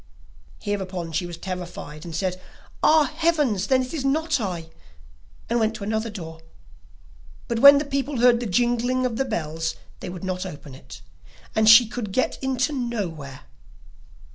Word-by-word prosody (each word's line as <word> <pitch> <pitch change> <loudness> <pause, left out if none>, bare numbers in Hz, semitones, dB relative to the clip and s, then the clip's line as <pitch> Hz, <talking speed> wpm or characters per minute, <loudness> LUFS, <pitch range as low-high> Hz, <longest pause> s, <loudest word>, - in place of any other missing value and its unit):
Hereupon 190 -5 -4
she 175 +3 -2
was 170 -1 -8
terrified, 175 -4 -7
and 165 -2 -6
said: 185 +2 -2 0.4
'Ah, 310 0 +6
heavens! 295 - +1
Then 260 -1 +3
it 255 - -8
is 300 -5 -3
not 300 +2 +1
I,' 170 -5 -4 0.8
and 235 - +1
went 220 0 +1
to 220 - -7
another 220 +2 -1
door; 165 -6 -8 1.1
but 235 -2 -1
when 280 +3 +10
the 290 - -1
people 275 0 -2
heard 240 0 +5
the 240 - -3
jingling 245 +5 +1
of 235 -3 -2
the 270 - 0
bells 160 -7 -3 0.2
they - - -6
would 180 0 -8
not 185 -1 -2
open 145 -6 -9
it, 65 - -12 0.5
and 220 0 +5
she 225 +1 +9
could 225 -3 -5
get 255 +6 0
in 265 -1 -1 0.3
nowhere. 160 - -5
215 Hz, 165 wpm, -24 LUFS, 175-255 Hz, 1.1 s, when